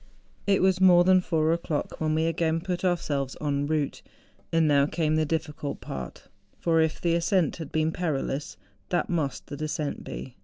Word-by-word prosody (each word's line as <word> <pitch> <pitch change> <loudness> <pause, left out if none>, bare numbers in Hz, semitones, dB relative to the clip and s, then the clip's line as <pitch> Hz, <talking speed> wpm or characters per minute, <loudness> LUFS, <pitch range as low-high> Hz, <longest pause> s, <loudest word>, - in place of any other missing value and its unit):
It 195 -2 +3
was 190 0 +3
more 180 -2 +7
than 185 0 +5
four 160 -2 +1
o'clock 165 -3 -3
when 155 0 +1
we 160 +1 +1
again 165 0 +1
put 180 +1 -3
ourselves 145 -7 -1
en 145 -1 -1
route. 150 -2 -1 0.5
And 165 -1 +3
now 140 -1 +4
came 155 -1 0
the 155 -1 +1
difficult 150 -2 -3
part; 65 -2 -7 0.3
for 165 -1 +2
if 160 -1 0
the 170 -1 +1
ascent 170 0 +1
had 160 -4 -7
been 155 0 +1
perilous 150 -4 -2 0.3
^hat 175 - 0
must 155 -6 -2
the 145 - -7
descent 155 -1 -3
be! 130 - -8
160 Hz, 180 wpm, -27 LUFS, 150-170 Hz, 0.5 s, more